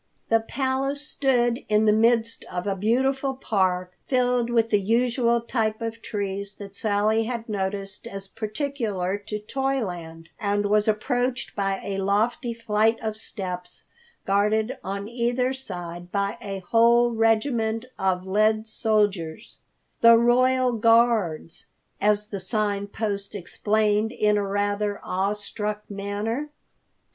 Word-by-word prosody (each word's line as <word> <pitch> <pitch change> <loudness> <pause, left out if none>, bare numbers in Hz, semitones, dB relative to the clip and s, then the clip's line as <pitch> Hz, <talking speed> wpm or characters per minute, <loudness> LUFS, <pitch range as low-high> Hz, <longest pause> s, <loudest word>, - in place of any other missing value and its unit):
The 225 - +5
Palace 270 +4 -2
stood 245 -5 +1
in 215 +1 +3
the 210 - +5
midst 230 +1 +2
of 180 0 -5
a 200 -1 0
beautiful 265 +6 +1
park, 185 -7 0
filled 250 -2 +2
with 230 -1 +2
the 205 - +4
usual 235 +2 +2
types 220 -2 -1
of 230 0 -4
trees 200 -1 -4
that 200 -1 -10
Sally 215 +1 +1
had 235 -1 -4
noticed 195 -1 -3
as 195 0 -7
peculiar 215 -4 -2
to 210 +1 -5
Toyland, 205 -10 -3
and 205 0 0
was 210 +1 +2
approached 245 +3 -1
by 195 -1 0
a 195 -1 -3
lofty 210 +5 +1
flight 225 -1 +1
of 220 -1 -3
steps, 180 -4 -6 0.4
guarded 215 +5 +1
on 200 +1 -4
either 245 +2 0
side 175 -8 -7
by 200 0 0
a 195 -1 -5
whole 235 +1 +5
regiment 225 0 +1
of 185 -1 0
lead 215 +3 +2
soldiers, 210 -5 -1 0.4
"The 230 0 +8
Royal 255 +2 +3
Guards," 225 -8 +2 0.3
as 210 +1 +2
the 200 - -4
Sign 200 +1 -1
Post 200 -1 -3
explained 210 +3 0
in 210 -3 +2
a 205 -1 0
rather 205 +1 -1
awe 195 +2 0
struck 210 0 -4
manner. 205 +8 -3
215 Hz, 130 wpm, -25 LUFS, 200-235 Hz, 0.4 s, The